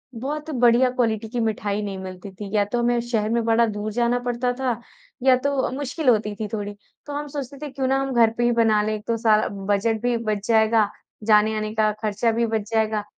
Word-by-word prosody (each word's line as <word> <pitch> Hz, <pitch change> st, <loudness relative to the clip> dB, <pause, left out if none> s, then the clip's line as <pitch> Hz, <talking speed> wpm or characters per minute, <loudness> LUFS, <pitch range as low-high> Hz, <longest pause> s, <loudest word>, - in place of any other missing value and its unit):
बहुत 295 Hz, +6 st, -4 dB
बढ़िया 245 Hz, -1 st, +4 dB
क्वालिटी 225 Hz, -3 st, -1 dB
की 240 Hz, +1 st, -3 dB
मिठाई 210 Hz, -2 st, -1 dB
नहीं 195 Hz, -2 st, -4 dB
मिलती 190 Hz, +1 st, -8 dB
थी 200 Hz, +1 st, -8 dB
या 205 Hz, -, +4 dB
तो 240 Hz, +4 st, -2 dB
हमें 240 Hz, 0 st, +2 dB
शहर 220 Hz, -3 st, 0 dB
में 235 Hz, 0 st, +1 dB
बड़ा 230 Hz, +1 st, +4 dB
दूर 210 Hz, 0 st, -4 dB
जाना 240 Hz, +2 st, +1 dB
पड़ता 245 Hz, +1 st, 0 dB
था 250 Hz, -4 st, -1 dB, 0.4 s
या 260 Hz, -1 st, +6 dB
तो 280 Hz, 0 st, 0 dB
मुश्किल 280 Hz, +1 st, -1 dB
होती 210 Hz, -2 st, +2 dB
थी 215 Hz, -, -2 dB
थोड़ी। 205 Hz, -1 st, -3 dB, 0.3 s
तो 290 Hz, -, -6 dB
हम 290 Hz, +1 st, -4 dB
सोचते 280 Hz, -1 st, -6 dB
थे -, -, -5 dB
क्यों 265 Hz, -1 st, -2 dB
ना 270 Hz, +1 st, +2 dB
हम 270 Hz, -1 st, -2 dB
घर 230 Hz, -2 st, +5 dB
पे 240 Hz, -, +1 dB
ही 240 Hz, -, +3 dB
बना 225 Hz, -2 st, +3 dB
लें 215 Hz, +1 st, -1 dB
एक 210 Hz, -1 st, -6 dB
तो 230 Hz, -, 0 dB
सा 220 Hz, -1 st, +4 dB
बजट 205 Hz, +3 st, -1 dB
भी 245 Hz, -1 st, +1 dB
बच 215 Hz, -2 st, -3 dB
जाएगा, 220 Hz, -2 st, +3 dB, 0.3 s
जाने-आने 215 Hz, 0 st, +2 dB
का 215 Hz, -1 st, +3 dB
ख़र्चा 215 Hz, +2 st, +1 dB
भी 235 Hz, +1 st, +1 dB
बच 220 Hz, -1 st, -2 dB
जाएगा, 220 Hz, -1 st, +1 dB
225 Hz, 225 wpm, -23 LUFS, 215-245 Hz, 0.4 s, या